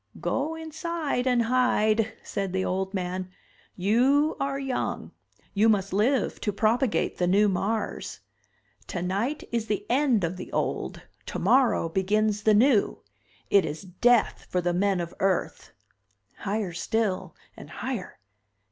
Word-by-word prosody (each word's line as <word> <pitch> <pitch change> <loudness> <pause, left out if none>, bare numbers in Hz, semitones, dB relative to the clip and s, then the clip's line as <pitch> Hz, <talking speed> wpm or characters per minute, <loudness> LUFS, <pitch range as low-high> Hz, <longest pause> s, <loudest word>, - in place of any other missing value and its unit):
"Go 305 +4 -1
inside 320 -4 -3
and 245 -2 +3
hide," 225 -3 +2
said 195 -2 -3
the 190 0 0
old 190 +1 -1
man. 185 -1 -3 0.5
"You 255 - +3
are 275 0 -1
young, 270 -2 -3 0.4
you 215 +2 +4
must 195 -3 +1
live 240 +7 +1
to 210 - 0
propagate 225 +4 +1
the 180 - +2
new 200 +3 +4
Mars. 205 +3 -2 0.7
Tonight 195 - -2
is 230 -2 -1
the 210 -1 -2
end 255 -6 +3
of 170 +2 -2
the 185 - -8
old, - - -2 0.2
tomorrow 255 -9 +2
begins 210 +4 +1
the 215 0 +4
new! 235 -1 +3 0.5
It 200 -2 +6
is 155 +5 -5
death 225 +6 +2
for 180 - 0
the 175 0 0
men 195 +1 +1
of 170 0 -6
Earth!" 190 -1 -1 0.7
Higher 200 -3 -2
still 200 +2 -1 0.2
and - - -11
higher. 250 -8 -5
210 Hz, 135 wpm, -26 LUFS, 190-250 Hz, 0.7 s, It